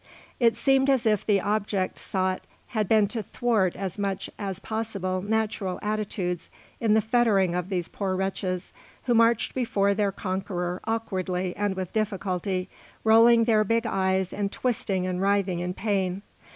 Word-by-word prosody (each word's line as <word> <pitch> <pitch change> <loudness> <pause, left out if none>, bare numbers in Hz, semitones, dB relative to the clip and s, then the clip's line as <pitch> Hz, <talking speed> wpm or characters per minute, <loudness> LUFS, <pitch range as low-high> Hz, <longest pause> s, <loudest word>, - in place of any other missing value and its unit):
It 230 -2 +3
seemed 270 0 +3
as 260 -3 +3
if 215 -3 +2
the 205 -2 +3
object 205 -2 -1
sought 185 -1 -1 0.3
had 215 -4 -1
been 215 -2 +5
to 225 +1 -3
thwart 215 -3 0
as 195 +1 -4
much 195 -2 -2
as 195 -3 -3
possible 200 -4 -3
natural 210 -2 -1
attitudes 205 -4 -2 0.3
in 220 -2 +3
the 220 - +4
fettering 215 -5 +2
of 180 +1 -2
these 180 -3 -1
poor 190 -2 -2
wretches, 190 -1 -2 0.3
who 245 - +1
marched 230 0 +3
before 200 -6 +1
their 200 -1 +1
conqueror 185 -2 -3
awkwardly 185 -5 -2
and 205 -1 -1
with 185 -2 -5
difficulty, 190 -3 -1 0.4
rolling 230 +1 +6
their 220 -2 +3
big 230 +3 +1
eyes 190 -3 0
and 200 -1 -2
twisting 200 -7 -1
and 185 0 -2
writhing 195 -3 +1
in 180 +1 -3
pain. 195 -2 -1
200 Hz, 155 wpm, -26 LUFS, 185-220 Hz, 0.4 s, rolling